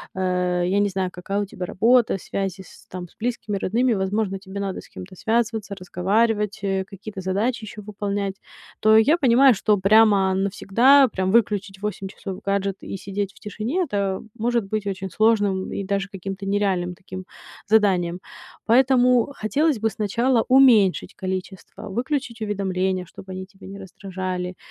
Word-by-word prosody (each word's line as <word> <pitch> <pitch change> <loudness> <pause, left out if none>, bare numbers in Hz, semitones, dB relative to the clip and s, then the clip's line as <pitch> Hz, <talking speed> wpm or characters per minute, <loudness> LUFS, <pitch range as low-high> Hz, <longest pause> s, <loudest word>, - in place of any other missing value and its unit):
э, 180 -1 0
я 195 +2 +2
не 205 0 +2
знаю, 190 -1 -2
какая 195 +3 -3
у - - -2
тебя 185 -2 -6
работа, 230 +3 +3
связи 195 +1 -4
с, 190 - -16
там, 180 -1 -7
с - - -26
близкими, 225 -3 -2
родными, 235 +6 +1
возможно, 195 0 -1
тебе 190 +1 -8
надо 195 -1 -3
с - - -17
кем-то 185 +1 -10
связываться, 220 0 -1
разговаривать, 210 +3 0
э, 195 -1 -1
какие-то 195 +1 -9
задачи 210 +6 -1
ещё 215 0 -8
выполнять. 200 -1 -3 0.4
То 215 0 +5
я 285 +10 +5
понимаю, 260 -3 +5
что 210 +1 +2
прямо 200 -1 +4
навсегда, 230 +8 +4
прям 190 -4 -2
выключить 205 -3 +1
в - - -24
8 205 -2 -4
часов 190 -1 -7
гаджет 195 -1 -1
и - - -6
сидеть 195 0 -4
в - - -20
тишине- 225 - -2
это 200 - -2 0.2
может 235 -1 0
быть 210 +1 -3
очень 190 -1 -4
сложным 205 -2 +1
и 200 - -3
даже 195 0 -2
каким-то 195 0 -6
нереальным 195 -3 0
таким 185 0 -9 0.4
заданием. 185 -5 +2 0.5
Поэтому 250 +1 +4
хотелось 275 +5 0
бы 225 +1 +1
сначала 225 +4 +1
уменьшить 245 -8 +5
количество, 190 +2 -6
выключить 245 +1 -3
уведомления, 190 -3 -1
чтобы 190 +2 -12
они 185 0 -6
тебя 195 0 -15
не 200 +1 -9
раздражали, 185 -1 -5
200 Hz, 160 wpm, -23 LUFS, 190-220 Hz, 0.5 s, То